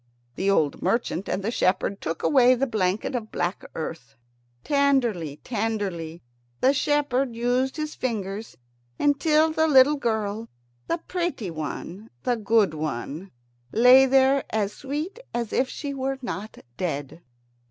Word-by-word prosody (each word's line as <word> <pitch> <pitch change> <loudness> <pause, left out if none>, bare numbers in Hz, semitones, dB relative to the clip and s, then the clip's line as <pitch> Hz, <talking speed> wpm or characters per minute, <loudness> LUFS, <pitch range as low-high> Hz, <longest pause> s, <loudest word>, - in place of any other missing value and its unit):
The 195 +8 -1
old 155 -7 +1
merchant 195 -1 -1
and 195 - -2
the 220 - -1
shepherd 195 -1 0
took 165 - -4
away 255 -3 +5
the 260 +2 0
blanket 210 -4 -1
of 230 -3 -4
black 175 +2 -2
earth. 155 -4 -6 0.5
Tenderly, 250 - +1
tenderly 200 -8 -3 0.4
the 265 - +4
shepherd 275 -4 +1
used 250 +4 0
his 305 0 -3
fingers, 215 -3 -4 0.4
until 305 +2 +3
the 320 0 +2
little 285 0 +6
girl, 220 -3 -2 0.4
the - - 0
pretty 340 - -3
one, 170 +6 -6
the 245 - +1
good 215 -5 +2
one, 155 +4 -4 0.4
lay 255 +3 +7
there 270 +1 +4
as 210 -2 -1
sweet 300 - -5 0.2
as 235 -2 -2
if 260 0 +1
she 285 -1 -5
were 270 0 -2
not 215 -3 -5 0.2
dead. 160 -2 -4
230 Hz, 135 wpm, -25 LUFS, 190-270 Hz, 0.5 s, lay